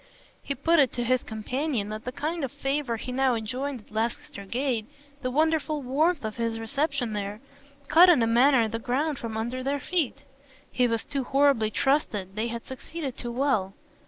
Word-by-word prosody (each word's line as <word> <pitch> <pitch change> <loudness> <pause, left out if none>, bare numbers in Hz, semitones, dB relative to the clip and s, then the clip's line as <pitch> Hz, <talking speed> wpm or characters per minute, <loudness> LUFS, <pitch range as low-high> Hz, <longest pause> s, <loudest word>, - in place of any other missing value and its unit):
He 280 - -3
put 330 +5 +3
it 270 -4 +4
to 240 - -1
his 255 +1 +2
companion 235 +1 -2
that 215 +1 -6
the 250 - -3
kind 315 +4 -3
of 265 - -2
favour 270 -4 -1
he 250 - -6
now 260 -1 +2
enjoyed 250 +4 -3
at 210 - -24
Lancaster 215 -2 -3
Gate, 235 0 -1 0.3
the 255 - -1
wonderful 310 +1 +1
warmth 290 +3 +1
of 215 +1 -4
his 230 -1 -1
reception 275 0 -1
there, 205 0 -4 0.5
cut 355 +3 +8
in 305 -10 +5
a - - +4
manner 240 +1 +4
the 225 +1 -3
ground 270 +5 -1
from 225 -2 -4
under 240 +3 -2
their 280 +2 -1
feet. 285 -3 -1 0.5
He 250 -1 +2
was 230 -1 0
too 280 -2 -2
horribly 270 -5 +3
trusted 215 -8 0
they 220 +2 -1
had 235 0 -5
succeeded 270 +1 -6
too 240 - -5
well. 235 -7 0
255 Hz, 190 wpm, -27 LUFS, 225-285 Hz, 0.5 s, cut